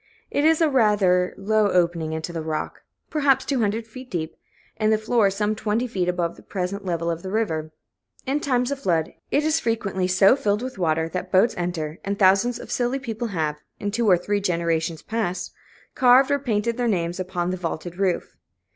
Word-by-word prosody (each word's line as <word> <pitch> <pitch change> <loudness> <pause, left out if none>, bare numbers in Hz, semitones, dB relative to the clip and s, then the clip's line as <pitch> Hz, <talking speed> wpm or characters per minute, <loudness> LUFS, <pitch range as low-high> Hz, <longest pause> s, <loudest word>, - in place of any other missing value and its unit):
It 290 - +1
is 320 +1 +4
a 325 - +5
rather 205 -9 +3
low 215 +1 +2
opening 170 -3 +1
into 160 +2 -4
the 165 - -3
rock, 155 -1 -4 0.3
perhaps 280 -4 +2
two 275 -2 0
hundred 220 +1 0
feet 255 +3 -11
deep, 160 -5 -4 0.4
and 215 0 +2
the 220 - +4
floor 220 -1 +2
some 210 +2 0
twenty 215 +2 -1
feet 185 -7 -1
above 175 -1 -1
the - - -14
present 195 +1 -4
level 170 -2 -1
of 165 0 -4
the 190 - -6
river; 160 -8 -1 0.5
in 275 +2 0
times 250 -3 0
of 280 - -3
flood, 165 - 0 0.2
it 290 - +2
is 315 +1 +2
frequently 200 -7 -1
so 190 +5 +5
filled 210 -3 0
with 255 -6 -6
water 160 -2 +1
that 185 +1 -5
boats 195 +5 +4
enter, 170 -3 -3
and 200 0 -2
thousands 200 +5 +4
of - - -10
silly 245 +2 0
people 235 -3 -4
have, 155 -7 -2 0.2
in 205 - -2
two 225 0 +1
or 180 - +6
three 205 +3 -1
generations 170 -3 -1
past, 220 -5 -3 0.4
carved 255 +2 +5
or 285 - +2
painted 230 -3 -1
their 245 -1 0
names 175 -4 -1
upon 180 -1 -2
the 185 - -2
vaulted 175 +1 -5
roof. 190 -3 -1
200 Hz, 200 wpm, -23 LUFS, 175-235 Hz, 0.5 s, or